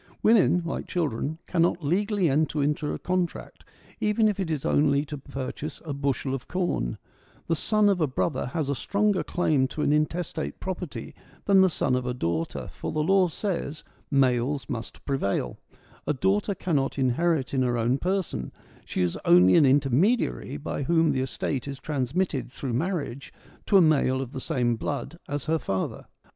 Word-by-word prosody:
Women, 205 -5 +4
like 170 - -4
children, 155 -2 -2
cannot 170 -2 +1
legally 200 +3 +1
enter 150 +1 +1
into 150 +1 0
a - - -3
contract, 180 -1 -3 0.4
even 215 0 +2
if 205 -2 -1
it 185 -4 -1
is 155 -4 -2
only 145 0 +3
to 145 -1 -6
purchase 140 +3 -6
a 150 - -3
bushel 140 -1 -1
of 135 - -5
corn; 175 - -1 0.5
the 165 - +1
son 215 +6 +2
of 195 -4 +2
a 155 - +3
brother 130 +1 -1
has 150 +2 -2
a 140 - +1
stronger 200 - +1
claim 150 -7 +1
to 150 - -4
an 145 - +3
intestate 155 +1 -1
property 180 -4 -5 0.3
than 195 -1 +6
the 190 - +5
son 140 -5 0
of 125 0 0
a 125 - -2
daughter, 85 -6 -2
for - - -6
the 155 - 0
law 190 +2 +4
says, 165 -4 -3 0.2
' - - -35 0.2
males 125 +2 -1
must 115 -2 -6
prevail 100 - -1 0.2
'; - - -28
a 150 - +2
daughter 200 +7 +1
cannot 145 -9 -1
inherit 135 +2 +1
in 135 - +2
her 120 -1 +1
own 120 +4 +1
person; 180 - -2 0.3
she - - -1
is 90 - -1
only 90 +1 +6
an 150 -4 +6
intermediary 140 - +2
by 145 -1 -4
whom 160 +2 +3
the 130 -2 0
estate 130 0 -3
is 140 -1 -6
transmitted 140 -1 -1
through 130 -2 -4
marriage 140 -2 -2 0.4
to 200 - +6
a - - +7
male 145 -5 +3
of 130 -2 -4
the 130 - -6
same 125 -7 0
blood 145 +6 -4
as 145 -2 -3
her 160 +1 +1
father. 95 -8 -3
150 Hz, 180 wpm, -26 LUFS, 130-175 Hz, 0.5 s, a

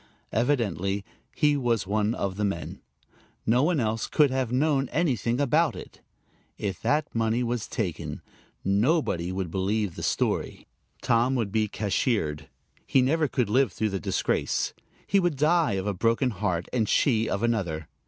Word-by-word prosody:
Evidently 100 - 0 0.3
he 150 -2 +3
was 120 -7 0
one 105 +3 0
of 95 -1 -2
the 105 - -2
men. 100 -4 -3 0.6
No 120 +3 +3
one 160 +1 +2
else 110 -1 -1
could 150 -4 +3
have 130 -3 -1
known 135 0 +1
anything 125 - 0
about 150 +4 +2
it. - - -11 0.6
If 100 -2 -4
that 150 +1 0
money 115 +1 +1
was 120 -2 -2
taken, 95 -10 -4 0.4
nobody 100 - +1
would 95 -3 -3
believe 100 +1 0
the - - -7
story; - - -1 0.4
Tom 120 +3 +2
would 115 -6 -1
be 110 0 +1
cashiered; 100 - -1 0.4
he 130 - +4
never 155 +4 +2
could 125 -4 0
live 125 +1 +2
through 110 +2 -1
the 95 -1 -2
disgrace; - - -1 0.3
he 200 - +3
would 175 -4 +1
die 155 0 +3
of 95 0 -2
a 105 - 0
broken 115 +6 +1
heart, 95 -4 -2
and 115 -4 +1
she 115 -5 +2
of 100 - -2
another. 90 -10 -1
115 Hz, 160 wpm, -26 LUFS, 100-135 Hz, 0.6 s, he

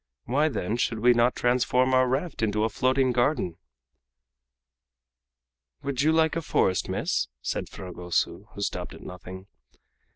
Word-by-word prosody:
Why, 150 +5 +2
then, 110 -3 -2
should 120 -2 0
we 120 +3 +5
not 120 +1 +3
transform 125 +1 +2
our 130 0 +4
raft 135 +5 -2
into 105 -1 +1
a 110 - +2
floating 130 +3 +2
garden?" 120 - 0 2.2
"Would 135 -2 -1
you 155 +2 +4
like 160 0 +3
a 165 - -1
forest, 95 - +1
miss?" - - 0 0.2
said - - -3
Fragoso, 90 -2 -3
who - - -6
stopped - - -4
at - - -13
nothing. 90 +1 -9
125 Hz, 140 wpm, -26 LUFS, 105-135 Hz, 2.2 s, we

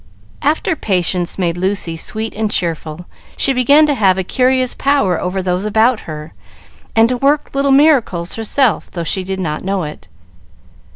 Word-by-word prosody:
After 315 +4 0
Patience 180 - -1
made 175 -2 -1
Lucy 185 -2 -1
sweet 220 +7 -5
and 215 0 -2
cheerful, 165 -3 -3 0.3
she 270 - +2
began 280 +5 +5
to 295 - +1
have 195 -7 +2
a 190 - -1
curious 255 +4 +1
power 270 - +1
over 185 +1 -2
those 180 +1 -1
about 220 +3 +2
her, 155 +1 -8 0.6
and 225 0 +5
to 250 +1 -1
work 285 +3 +1
little 275 0 +1
miracles 270 - +3
herself, 225 +2 0
though 170 - -5
she 185 +3 -1
did 190 +1 -4
not 155 -4 -3
know 195 -1 -1
it. 150 - -8
200 Hz, 165 wpm, -16 LUFS, 180-260 Hz, 0.6 s, began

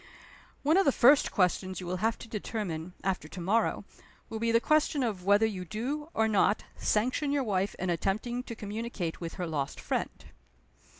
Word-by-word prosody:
One 310 +5 +4
of 390 - +4
the 280 - +5
first 270 +3 +5
questions 185 0 +1
you 185 - -6
will 180 +1 -2
have 220 +4 0
to - - -10
determine, 190 -6 -4
after 185 -5 -1
to 180 - -9
morrow, 205 +7 +1 0.4
will 220 - -4
be 230 +1 +1
the 230 - +5
question 300 +1 +2
of 200 -7 -2
whether 205 +2 +5
you 195 -4 -3
do, 265 - -4
or 220 0 +3
not, 210 0 +2
sanction 255 +7 0
your 285 -1 +1
wife 200 -3 0
in 185 -1 -1
attempting 215 +8 -1
to 230 - -6
communicate 210 -5 -4
with 165 -1 -5
her 180 - -3
lost 145 -4 -3
friend." - - -3
210 Hz, 185 wpm, -30 LUFS, 185-235 Hz, 0.4 s, the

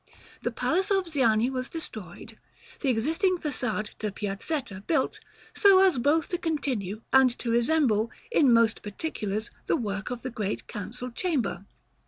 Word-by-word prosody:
The - - 0
palace 375 +4 0
of 390 -2 +2
Ziani 245 -6 +2
was 255 -1 -3
destroyed; 215 - -7 0.4
the 275 - 0
existing 325 - +2
façade 245 -9 -2
to 215 - -1
the - - -3
Piazzetta 200 +2 -4
built, 320 - +1 0.3
so 400 -2 +6
as 360 -10 +3
both 290 +5 +2
to 350 - -2
continue 235 - -2
and 265 -1 +7
to 235 - -2
resemble, 235 -3 +2 0.2
in 285 - +5
most 230 -1 +4
particulars, 210 -2 -4 0.2
the - - +2
work 205 -5 -3
of 250 -1 -5
the 255 - -4
Great 210 -3 -3
Council 245 +5 -6
Chamber. 235 - -1
250 Hz, 155 wpm, -27 LUFS, 215-315 Hz, 0.4 s, and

